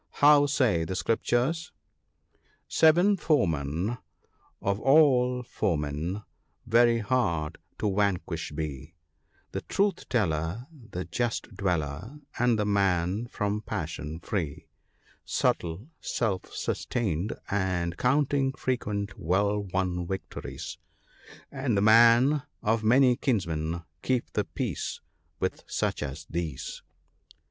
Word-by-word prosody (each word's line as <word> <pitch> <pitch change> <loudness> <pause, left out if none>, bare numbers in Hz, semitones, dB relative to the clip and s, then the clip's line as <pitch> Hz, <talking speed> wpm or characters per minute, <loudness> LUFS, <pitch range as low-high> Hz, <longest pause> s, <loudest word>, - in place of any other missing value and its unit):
How 145 0 +6
say 125 - +2
the 95 +3 -3
Scriptures? 125 - 0 0.3
— - - -45
" - - -39
Seven 175 +6 +6
foemen 90 - 0 0.6
of 100 +1 -1
all 125 -3 +4
foemen, 80 0 -2 0.4
very 120 +1 +5
hard 100 -9 0 0.2
to 105 -2 0
vanquish 90 -6 0
be: 75 +1 -5 0.6
The - - -3
Truth 200 -2 0
teller, 90 0 0
the 115 - -7
Just 115 +4 -2
dweller, 90 - -2 0.2
and 120 -2 +3
the 105 - 0
man 100 +1 +1
from 105 -2 -2
passion 80 -6 -4
free, 80 -7 -3 0.6
Subtle, 85 - -1
self 100 -6 -2
sustained, 100 -5 -2 0.2
and 90 -4 0
counting 135 +2 +2
frequent 105 -7 -2
well 100 +5 +1
won 90 -2 -1
victories, 95 0 -6 0.7
And 135 -6 -1
the - - +3
man 115 +6 +6 0.2
of 110 +1 +1
many 125 +2 +5
kinsmen 85 - -1
— 85 +3 -46
keep 130 -2 -1
the - - 0
peace - - -3 0.4
with - - -2
such - - -1
as 75 +3 -5
these." 80 -5 -4
100 Hz, 110 wpm, -28 LUFS, 85-125 Hz, 0.7 s, How